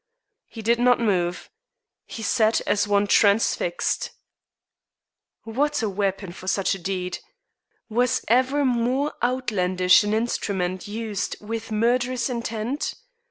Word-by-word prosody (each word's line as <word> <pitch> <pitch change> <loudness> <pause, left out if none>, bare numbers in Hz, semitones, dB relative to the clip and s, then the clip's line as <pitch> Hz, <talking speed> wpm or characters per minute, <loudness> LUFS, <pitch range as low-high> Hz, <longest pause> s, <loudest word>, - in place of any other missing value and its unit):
He 225 - -9
did 235 +2 +2
not 245 0 +4
move. 180 -6 -1 0.6
He 225 - -7
sat 220 -1 +2
as 205 0 0
one 205 0 +3
transfixed. 215 - +2 1.3
What 285 +4 -1
a 215 - 0
weapon 195 -1 -2
for 185 +2 -11
such 195 0 +1
a 195 - -5
deed! 180 0 -3 0.7
Was 245 +2 0
ever 260 +5 +2
more 255 +4 +1
outlandish 195 -8 +3
instrument 200 -4 -1
used 215 -1 -3
with 225 +1 -6
murderous 240 +3 +1
intent? 235 +3 -3
220 Hz, 115 wpm, -24 LUFS, 200-245 Hz, 1.3 s, not